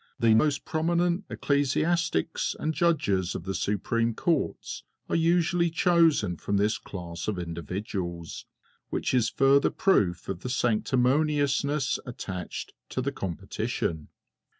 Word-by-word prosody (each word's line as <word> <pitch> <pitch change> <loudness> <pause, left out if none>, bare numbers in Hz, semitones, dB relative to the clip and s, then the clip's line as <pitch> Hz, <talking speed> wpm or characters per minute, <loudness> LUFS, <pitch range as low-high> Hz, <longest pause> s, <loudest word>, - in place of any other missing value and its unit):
The 115 -2 +5
most 140 +5 +2
prominent 170 +4 0
ecclesiastics 145 - 0
and 155 - -1
Judges 135 - +1
of - - -4
the 95 +2 -3
Supreme 115 +4 0
Courts 170 +5 -1 0.3
are - - -1
usually 170 +1 +2
chosen 165 - +3
from 100 +4 -1
this 105 +2 +1
class 85 -3 -7
of 105 -3 -1
individuals, 85 +1 -5 0.4
which - - -1
is 120 -3 +3
a - - -20
further 140 +1 +4
proof 95 - +1
of 95 -3 -3
the 125 - -5
sanctimoniousness 140 +4 +1
attached 95 -7 -6 0.2
to 130 - -2
the 140 - -1
competition. 85 - -3
125 Hz, 125 wpm, -27 LUFS, 95-155 Hz, 0.4 s, The